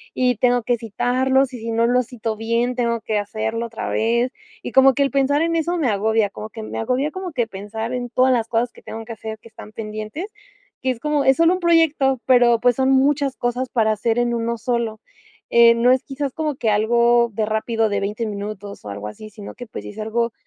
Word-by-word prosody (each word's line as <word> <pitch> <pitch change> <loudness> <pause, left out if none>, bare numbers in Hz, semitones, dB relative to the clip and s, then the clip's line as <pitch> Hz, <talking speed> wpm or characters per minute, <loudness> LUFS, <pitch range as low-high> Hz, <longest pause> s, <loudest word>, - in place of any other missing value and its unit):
y 250 -1 +2
tengo 245 +1 +2
que 240 +1 +1
citarlos 255 +4 +1
y 245 - -6
si 230 +1 -4
no 230 +1 +2
lo 250 +1 +3
cito 225 -2 -4
bien, 230 +3 0
tengo 235 -1 0
que 215 - -1
hacerlo 220 +3 -3
otra 230 -1 -5
vez", 235 +3 +1 0.3
y - - -5
como 265 0 +6
que 280 - +2
el 275 - 0
pensar 280 +2 +2
en 335 0 0
eso 335 +2 0
me 310 -6 +1
agobia 215 +1 +1
como 215 - -8
que 220 0 -8
me - - -5
agobia, 255 +6 0
como 375 0 -6
que 240 -5 0
pensar 220 +3 -6
en 245 -1 -3
todas 255 +2 +3
las 230 -2 0
cosas 235 +1 0
que - - -16
tengo 225 0 -8
que 230 - -7
hacer 220 0 -7
que 230 - -16
están 215 -1 -12
pendientes, 215 - -6 0.5
que 260 - -1
es 245 - -6
como 300 +1 0
es 265 0 +4
solo 335 +1 +4
un 370 - -2
proyecto, 320 -6 +3
pero 245 -2 +5
pues 245 0 +3
son 265 +1 +2
muchas 275 0 +2
cosas 245 +1 -2
para 220 -3 +2
hacer 225 +2 0
en 240 0 +1
uno 235 0 -1
solo. 230 -1 -2 0.5
Eh, 235 0 +6
no 240 +2 +4
es 255 0 +2
quizás 275 -1 -4
como 305 -2 -2
que 230 -3 -1
algo 235 +2 +3
de 215 +1 0
rápido 220 +1 0
de 200 -1 0
20 210 +3 -3
minutos 205 -1 -6
o - - -6
algo 100 +1 -6
así, 215 - -9
sino 205 -1 -10
que 245 - -9
pues - - -8
sí - - -8
es 210 - -12
algo, 230 +2 -1
235 Hz, 235 wpm, -21 LUFS, 220-260 Hz, 0.5 s, como